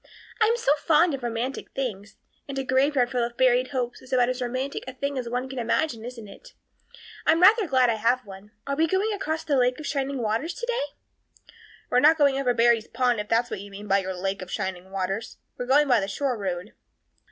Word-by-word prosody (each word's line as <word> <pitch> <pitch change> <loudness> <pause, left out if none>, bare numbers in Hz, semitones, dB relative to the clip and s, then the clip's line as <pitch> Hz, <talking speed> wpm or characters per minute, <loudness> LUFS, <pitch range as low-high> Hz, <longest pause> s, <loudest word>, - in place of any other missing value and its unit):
I 440 - +6
am 465 +2 +2
so 460 - +1
fond 320 +2 +3
of 270 - -4
romantic 240 +3 -4
things, 215 -6 -4 0.3
and 275 -1 -6
a 270 - -1
graveyard 260 -1 +2
full 250 -2 0
of 235 0 -4
buried 255 0 +3
hopes 250 -3 -3
is 260 - -15
about 250 -1 +3
as 255 0 -3
romantic 255 +3 -3
a 260 - -6
thing 280 +2 -3
as 250 -3 -3
one 250 +2 -2
can 265 -1 -6
imagine 235 0 -1
isn't 235 -3 -8
it? 200 - -14 0.7
I'm 325 - +5
rather 410 +3 +6
glad 255 -4 +3
I 220 - -1
have 245 +4 +1
one. 195 +1 -12 0.2
Are 280 - -2
we 320 +3 +2
going 390 +5 0
across 320 -6 -3
the 285 -3 +1
Lake 250 +1 +2
of 305 - -7
Shining 275 -1 -2
Waters 235 +9 -2
today?" 480 -8 -2 1.1
"We're 250 - +5
not 310 +4 +6
going 280 -3 +3
over 250 -3 +1
Barry's 230 -1 +3
pond, 245 -3 +1
if 210 - -4
that's 230 +2 +1
what - - -4
you 205 - -10
mean 200 +1 -9
by 195 0 +3
your 190 -1 -4
Lake 195 +2 -3
of 185 - -8
Shining 190 0 -4
Waters. 195 +3 -3 0.2
We're 245 - -5
going 290 +3 +4
by 245 -4 +4
the 195 - -2
shore 260 +5 -1
road." 190 -1 -4
250 Hz, 225 wpm, -25 LUFS, 225-280 Hz, 1.1 s, I